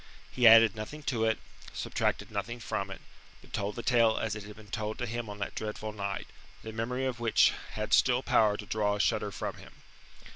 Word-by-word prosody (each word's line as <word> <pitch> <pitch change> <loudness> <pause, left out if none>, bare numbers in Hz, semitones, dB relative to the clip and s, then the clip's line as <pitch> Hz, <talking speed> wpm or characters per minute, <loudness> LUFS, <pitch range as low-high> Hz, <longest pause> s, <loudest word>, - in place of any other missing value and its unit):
He 125 -2 +4
added 115 0 +8
nothing 125 +8 -7
to 115 -5 0
it, 110 0 +2 0.4
subtracted - - -2
nothing 120 +3 -4
from 100 -4 -3
it, 95 - -8 0.4
but - - -19
told 100 +1 -2
the 120 - -5
tale 115 -2 +4
as 110 -2 -1
it 105 - -5
had 105 0 -10
been 105 -2 -15
told 110 -1 -3
to 125 - -2
him 120 -1 -4
on 105 - -7
that 100 - -4
dreadful 110 0 -4
night, 100 -1 -4 0.4
the 110 - -7
memory 125 +4 -2
of 130 -2 -2
which 115 -2 +4 0.2
had - - -3
still - - +4
power 105 -2 +3
to 105 - -7
draw 105 -1 0
a - - -5
shudder 105 -1 +1
from - - -5
him. - - -14
110 Hz, 215 wpm, -30 LUFS, 105-120 Hz, 0.4 s, added